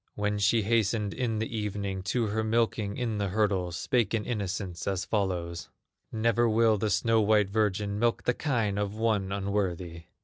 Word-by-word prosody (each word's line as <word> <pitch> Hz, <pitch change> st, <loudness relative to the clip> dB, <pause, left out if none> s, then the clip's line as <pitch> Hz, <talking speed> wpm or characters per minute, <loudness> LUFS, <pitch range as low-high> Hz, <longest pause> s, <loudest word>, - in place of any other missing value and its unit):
When 105 Hz, 0 st, -1 dB
she 105 Hz, +3 st, +3 dB
hastened 105 Hz, -1 st, +1 dB
in 120 Hz, -4 st, -1 dB
the 110 Hz, +1 st, -3 dB
evening 100 Hz, -2 st, -3 dB
To 120 Hz, +3 st, 0 dB
her 110 Hz, +1 st, -1 dB
milking 110 Hz, -2 st, 0 dB
in 115 Hz, -4 st, -2 dB
the 100 Hz, -, 0 dB
hurdles, 95 Hz, -4 st, 0 dB
Spake 115 Hz, +5 st, +1 dB
in 110 Hz, -, -2 dB
innocence 100 Hz, -5 st, -3 dB
as 95 Hz, 0 st, -1 dB
follows: 90 Hz, -5 st, -2 dB, 0.4 s
"Never 115 Hz, +1 st, +2 dB
will 110 Hz, -1 st, +3 dB
the 110 Hz, -, 0 dB
snow 115 Hz, +1 st, +2 dB
white 105 Hz, -2 st, +3 dB
virgin 105 Hz, -1 st, 0 dB
Milk 120 Hz, 0 st, +1 dB
the 125 Hz, -, +2 dB
kine 115 Hz, -8 st, -1 dB
of 105 Hz, 0 st, -2 dB
one 110 Hz, -4 st, 0 dB
unworthy!" 95 Hz, -4 st, -2 dB
105 Hz, 170 wpm, -28 LUFS, 100-110 Hz, 0.4 s, she